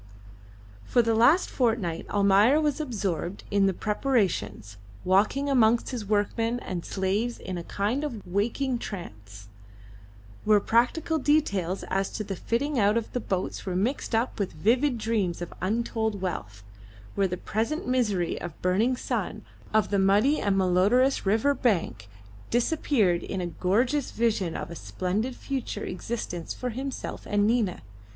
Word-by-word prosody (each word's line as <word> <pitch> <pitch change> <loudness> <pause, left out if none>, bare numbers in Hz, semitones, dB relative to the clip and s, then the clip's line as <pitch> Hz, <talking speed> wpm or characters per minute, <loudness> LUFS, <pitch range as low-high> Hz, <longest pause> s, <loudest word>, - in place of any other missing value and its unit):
For 240 - +2
the 230 0 +1
last 245 +11 +5
fortnight 220 -10 0
Almayer 205 +7 +4
was 300 -1 0
absorbed 200 - -3
in 200 -1 +3
the - - +3
preparations, 185 - -1 0.3
walking 210 +10 +2
amongst 235 -4 +3
his 235 -5 -4
workmen 225 +3 0
and 175 -3 -4
slaves 205 +5 -1
in 185 - -6
a 175 - -5
kind 210 - -1
of 240 -9 -5
waking 235 +7 -1
trance, 105 - -8 1.0
where 210 -1 +5
practical 300 +10 +1
details 200 - +1
as 195 +1 -1
to 215 - -3
the 195 -1 -4
fitting 260 +8 -1
out 205 +1 +3
of 230 - -3
the 250 - 0
boats 190 -5 -3
were 180 - -1
mixed 230 +5 -1
up 230 +1 -1
with 200 - -2
vivid 245 - +2
dreams 215 -6 -1
of 175 - -6
untold 220 +1 -1
wealth, 105 - -5 0.5
where 195 -1 +2
the 180 0 -4
present 230 - -2
misery 210 -9 0
of 175 -3 -7
burning 215 +8 +2
sun, - - -3 0.3
of 215 -1 +2
the 200 - +2
muddy 205 +10 +3
and 200 -1 +1
malodorous 195 +8 +3
river 225 +8 +3
bank 200 - -1 0.4
disappeared 235 - +2
in 190 - -4
a 180 - -2
gorgeous 235 - 0
vision 210 -7 0
of - - -6
a - - -6
splendid 205 +10 -2
future 265 -2 -4
existence 180 -4 -4
for 250 -1 -3
himself 265 +3 -5
and 205 0 +2
Nina. 220 -5 +1
215 Hz, 150 wpm, -27 LUFS, 185-245 Hz, 1.0 s, last